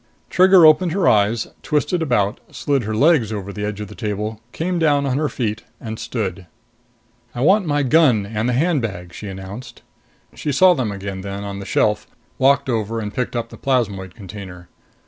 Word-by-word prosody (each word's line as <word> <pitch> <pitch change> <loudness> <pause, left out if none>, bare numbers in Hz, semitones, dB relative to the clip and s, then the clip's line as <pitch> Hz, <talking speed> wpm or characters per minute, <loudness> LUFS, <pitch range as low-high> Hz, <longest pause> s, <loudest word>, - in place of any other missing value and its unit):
Trigger 185 -2 +7
opened 160 +2 +5
her 195 0 +1
eyes, 105 +2 +3 0.2
twisted 150 +4 0
about, 110 -9 +1
slid 140 -5 -1
her 110 +1 -2
legs 140 -4 +3
over 100 -2 -5
the 105 - -5
edge 105 -1 -3
of 105 - -5
the 105 - -11
table, 105 0 -4
came 175 +9 -2
down 145 -3 +2
on 135 0 0
her 150 -1 0
feet, 115 -3 -3 0.4
stood. 100 -7 -4 0.9
"I 120 - -3
want 190 +6 +4
my 145 -1 +1
gun 130 -7 +4
and 110 +3 -2
the - - +1
handbag," 115 - -1
she 105 - -8
announced. 95 +5 -9 0.5
She 150 - -3
saw 180 +6 +6
them 125 -9 -2
again 100 -1 -5
then, 100 +1 -5
on 100 -1 -5
the 100 - -8
shelf, - - +1 0.3
walked 140 +1 +3
over 115 -2 -1
and 105 -1 -5
picked 125 -1 -3
up 115 -1 -2
the - - -13
plasmoid 105 -9 -1
container. 95 -4 -10
115 Hz, 185 wpm, -20 LUFS, 100-145 Hz, 0.9 s, Trigger